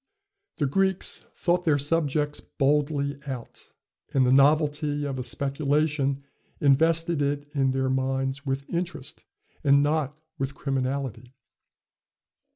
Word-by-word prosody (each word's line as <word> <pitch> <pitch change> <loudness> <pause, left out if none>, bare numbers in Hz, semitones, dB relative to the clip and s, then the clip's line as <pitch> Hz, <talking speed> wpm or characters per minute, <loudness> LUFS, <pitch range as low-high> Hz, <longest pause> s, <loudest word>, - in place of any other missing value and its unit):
The 150 - +1
Greeks 190 +6 +1
thought 175 0 +1
their 155 -4 +3
subjects 150 0 0
boldly 140 0 0
out; 130 -4 -7 0.4
and 130 -1 +4
the 125 - +4
novelty 145 +1 +3
of 135 -2 -3
a - - -2
speculation 140 +1 0 0.4
invested 160 +3 +3
it 145 +1 -2
in 135 -1 +2
their 130 0 0
minds 135 +1 -1
with 135 -1 -3
interest, 170 -4 -4 0.4
and 140 -1 +5
not 150 -1 0 0.2
with 135 +1 -2
criminality. 130 -2 -3
140 Hz, 115 wpm, -26 LUFS, 135-150 Hz, 0.4 s, and